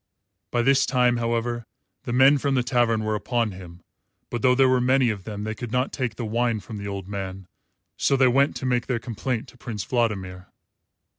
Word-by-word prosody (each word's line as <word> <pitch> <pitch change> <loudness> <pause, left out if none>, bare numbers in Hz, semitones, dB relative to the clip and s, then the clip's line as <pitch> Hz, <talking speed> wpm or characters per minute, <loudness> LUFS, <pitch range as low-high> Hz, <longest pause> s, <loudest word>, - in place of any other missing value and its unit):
By 120 - +1
this 135 +2 +4
time, 125 -2 +3
however, 120 0 -2 0.4
the - - -3
men 135 +3 +5
from 140 0 0
the 125 - +2
tavern 120 -3 +1
were 110 0 -1
upon 115 +1 -1
him; 90 -2 -11 0.5
but 120 - -3
though 125 +1 +4
there 135 0 +5
were 130 -1 +3
many 130 -1 +3
of 100 -3 -7
them 105 -2 -5
they 110 +1 -3
could 120 0 -7
not 125 +2 0
take 125 -5 -2
the 115 - -4
wine 115 0 0
from 105 +3 -8
the 100 0 -6
old 100 -2 -5
man, 95 -2 -6 0.5
so 140 - +2
they 130 -1 +5
went 135 +3 +3
to - - -5
make 125 -2 0
their 125 - 0
complaint 115 +2 -3
to 125 - -19
Prince 110 -4 -5
Vladimir. 95 -7 -2
120 Hz, 210 wpm, -24 LUFS, 105-125 Hz, 0.5 s, men